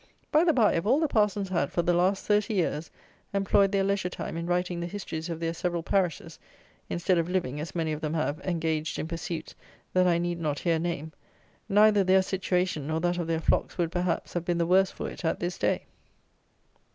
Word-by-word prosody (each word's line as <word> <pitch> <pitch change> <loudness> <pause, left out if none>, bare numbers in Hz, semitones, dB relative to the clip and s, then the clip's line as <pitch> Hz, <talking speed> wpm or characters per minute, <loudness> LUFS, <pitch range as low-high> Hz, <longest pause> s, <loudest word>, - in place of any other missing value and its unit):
By 310 +2 +5
the 345 - +4
bye 235 -8 +4
if 165 +4 -1
all 270 +6 +4
the 315 - +2
parsons 210 -5 +1
had, 170 -6 0
for 170 - 0
the 175 - +2
last 185 +3 +1
thirty 210 +1 +2
years, 160 -4 -1 0.5
employed 195 0 +3
their 195 -1 +2
leisure 195 -2 0
time - - -6
in 170 0 -4
writing 180 0 0
the 170 - -3
histories 175 -4 -5
of 165 -1 -4
their 165 0 -1
several 170 0 -2
parishes, 180 -3 -1 0.5
instead 175 +1 +1
of 165 +1 -1
living, 160 -7 -1
as 155 +4 -6
many 165 -2 0
of 155 0 -4
them 155 0 -2
have, 155 -1 -1
engaged 160 -3 -2
in - - -3
pursuits 165 -1 -5 0.4
that 185 0 +4
I 170 -1 +3
need 175 0 -2
not 150 -3 -1
here 165 0 +1
name, 160 -2 -3 0.6
neither 210 0 +5
their 190 0 +4
situation 185 -5 -1
nor 160 +1 0
that 175 0 0
of 170 - -2
their 165 -1 0
flocks - - 0
would, 170 -2 0
perhaps, 180 -1 -1
have 175 - -1
been 175 0 0
the 170 - +1
worse 185 +2 +4
for - - -6
it - - -8
at 160 - 0
this 175 +1 -3
day. - - 0
175 Hz, 215 wpm, -28 LUFS, 165-190 Hz, 0.6 s, By